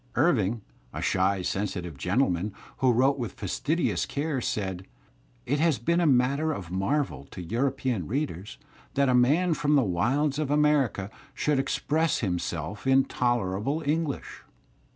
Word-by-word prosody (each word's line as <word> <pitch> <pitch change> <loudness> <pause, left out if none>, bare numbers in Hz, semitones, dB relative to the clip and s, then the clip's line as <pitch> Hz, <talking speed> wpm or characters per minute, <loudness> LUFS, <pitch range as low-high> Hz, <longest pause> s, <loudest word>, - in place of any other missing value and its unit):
\ - - -28
Irving, 120 - +2 0.3
a - - -4
shy, 95 0 +1
sensitive 90 -4 -3
gentleman, 90 - 0 0.3
who 130 -2 +3
wrote 135 +4 +3
with 120 -3 -4
fastidious 150 - -1
care, 145 -2 -2
said: 95 -5 -3 0.6
"It 145 +3 0
has 160 -3 +3
been 170 +8 +1
a 170 - +3
matter 140 +4 +2
of 90 - -6
marvel, 135 +11 -1
to - - -11
European 125 - -1
^ - - -12
readers, 110 - -3 0.4
that 140 -1 +3
a - - +3
man 150 +9 +4
from 150 -1 +1
the 140 - +4
wilds 135 - 0
of 150 -3 -1
America 145 -9 +2 0.2
should 150 -2 +1
express 150 +4 0
himself 90 - -3
in 135 0 +5
tolerable 120 - -1
English." 155 -1 -2
130 Hz, 150 wpm, -27 LUFS, 100-145 Hz, 0.6 s, in